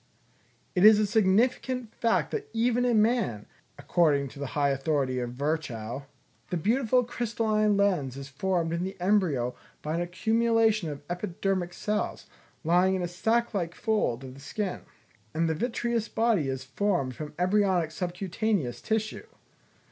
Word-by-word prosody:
It 180 - +2
is 215 0 +9
a 210 - +3
significant 225 +4 +1
fact 230 -1 +1
that 425 -1 -4
even 240 +2 +2
in 230 -4 +4
man, 215 - 0 0.3
according 145 -5 +2
to 140 - -12
the 140 - -3
high 140 -1 +3
authority 135 -2 0
of 120 -1 -4
Virchow, 135 -3 -3 0.4
the 180 - -1
beautiful 245 - +2
crystalline 220 -3 0
lens 175 -11 +1
is 140 0 -7
formed 165 +3 -1
in 170 +1 -1
the 190 0 -5
embryo 175 -11 +1 0.3
by 155 - -2
an 170 - 0
accumulation 220 +1 +2
of 145 -1 -7
epidermic 180 0 -2
cells, 210 +4 -2 0.4
lying 180 +3 +3
in 185 - -2
a - - -1
sack 225 +7 0
like 175 -4 -2
fold 210 - 0
of 130 -1 -8
the 135 - -13
skin; 185 +7 -4 0.5
and 165 +1 +2
the 160 - +1
vitreous 235 +4 -1
body 225 -10 +1
is 130 0 -3
formed 140 -2 -1
from 150 +1 -7
embryonic 185 -2 +2
subcutaneous 180 - -2
tissue. 220 -1 -2
185 Hz, 150 wpm, -28 LUFS, 150-220 Hz, 0.5 s, is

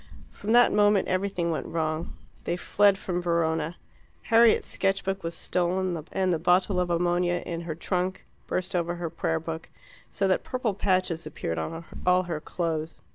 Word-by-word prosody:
From 210 - -4
that 245 0 +6
moment 205 -1 +4
everything 185 -2 0
went 160 - -3
wrong. 160 0 -2 0.3
They 175 - -1
fled 200 +2 +3
from 180 -2 -3
Verona. 165 -1 0 0.5
Harriet's 230 0 +5
sketch 195 0 0
book 195 0 -2
was 165 0 -3
stolen, 180 -1 -1
and 185 -2 +1
the 165 - 0
bottle 185 +2 +3
of 180 -1 0
ammonia 175 +1 +1
in 170 -1 -4
her 165 -2 -5
trunk 180 +2 -2 0.2
burst 185 0 -2
over 175 0 0
her 170 -2 -4
prayer 165 -1 -1
book, 165 0 -6 0.4
so 195 - 0
that 185 - +2
purple 250 -5 -1
patches 185 -4 0
appeared 80 0 -3
on 165 - -5 0.2
all 180 0 +4
her 170 -4 -3
clothes. 160 -1 -3
175 Hz, 170 wpm, -27 LUFS, 165-190 Hz, 0.5 s, that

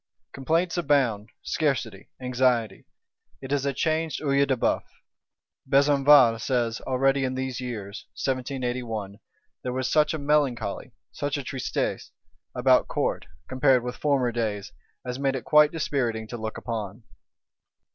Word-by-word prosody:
Complaints 165 +6 0
abound; 135 -10 +1
scarcity, 120 -10 -2
anxiety: 125 -5 0 0.5
it 135 0 -8
is 140 -1 0
a - - +2
changed 160 +3 -1
Œil 140 -1 +2
de 130 -1 +1
Bœuf. - - +1 0.9
Besenval 140 -4 +5
says, 120 -3 -1
already 135 +1 +2
in 130 0 -1
these 130 -1 -3
years 110 -5 -6
(1781) 125 -6 -3 0.4
there 125 - -3
was 130 0 -2
such 150 0 +3
a - - -2
melancholy 140 -7 0 0.2
(such 145 0 -2
a 140 - -4
tristesse) 130 0 -3 0.5
about 125 0 +4
Court, - - -2 0.2
compared 130 -1 +3
with 125 0 -4
former 135 -5 +1
days, 105 -4 -3 0.3
as 125 +1 -4
made 135 -1 0
it 125 - -5
quite 150 0 +5
dispiriting 125 -8 -1
to - - -5
look 110 -1 -5
upon. 110 -1 -5
130 Hz, 135 wpm, -26 LUFS, 120-140 Hz, 0.9 s, Besenval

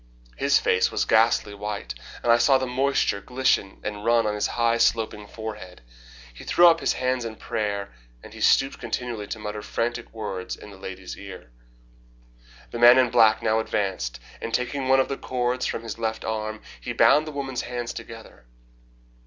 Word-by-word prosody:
His 140 +1 +3
face 90 - +2
was - - 0
ghastly 110 -2 +3
white, 100 -11 -5 0.3
and 120 - +4
I 120 - +5
saw 135 +3 +5
the 130 - -2
moisture 130 -5 0
glisten 125 -5 0
and 105 0 -5
run 115 0 +3
on 105 - 0
his 105 - 0
high, 115 -1 +1
sloping 110 -3 +1
forehead. 105 - -8 0.5
He - - -12
threw 175 - +4
up 165 -1 +5
his - - +1
hands 130 -1 -1
in 115 -1 -5
prayer 100 - -3 0.3
and - - -12
he - - -10
stooped 135 +1 +3
continually 120 -2 -4
to - - -5
mutter 105 0 -5
frantic 115 +2 -3
words 100 -5 -5
in 105 - -13
the 100 - -13
lady's 95 -1 -8
ear. 95 -10 -11 1.2
The 120 - -5
man 120 +1 +8
in 125 -2 +3
black 110 -3 +4
now 110 0 +2
advanced, 95 - -2 0.2
and 115 - -4
taking 130 +2 -2
one 135 0 +5
of 130 - +2
the 135 - -4
cords 125 0 -1
from 115 - -4
his 115 0 -6
left 110 -1 -3
arm, 110 0 -4 0.2
he - - -5
bound 155 +1 +4
the - - -5
woman's 135 -3 -3
hands 120 -1 -5
together. 115 - -11
115 Hz, 185 wpm, -25 LUFS, 105-125 Hz, 1.2 s, man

